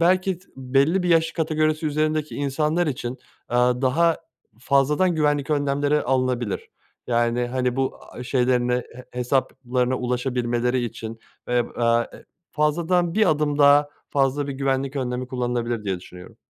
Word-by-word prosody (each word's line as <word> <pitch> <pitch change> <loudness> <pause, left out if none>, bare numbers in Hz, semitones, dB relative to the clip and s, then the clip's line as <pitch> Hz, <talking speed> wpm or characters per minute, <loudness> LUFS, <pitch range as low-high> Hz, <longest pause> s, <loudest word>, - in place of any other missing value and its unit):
belki 185 +2 +3
s 180 +3 -20
belli 140 +8 +2
bir 180 - -1
yaş 165 -1 +3
kategorisi 155 -1 0
üzerindeki 155 0 0
insanlar 150 +4 0
için, 125 -4 -3 0.4
eee, 120 - 0
daha 130 +7 +3 0.4
fazladan 145 +7 +2
güvenlik 145 -2 +1
önlemleri 145 0 +1
alınabilir, 125 -4 -1 0.4
yani, 120 0 +1
hani, 125 0 -1
bu, 135 0 -1
aaa, 125 - -11
şeylerine 125 -1 +1
he 125 0 -6
hesaplarına 125 0 0
ulaşabilmeleri 125 0 0
için, 115 -1 -6 0.3
eb 120 -1 +1
aaa, 115 0 +2
eee, - - -13 0.3
fazladan 165 +3 +1
bir 215 -4 +4
adım 150 -1 0
daha 145 0 +6 0.2
fazla 140 +1 +1
bir - - -2
güvenlik 135 0 -1
önlemi 125 -1 -2
kullanılabilir 120 -3 -2
diye 95 -3 -2
düşünüyorum. 90 0 -13
135 Hz, 140 wpm, -23 LUFS, 125-150 Hz, 0.4 s, daha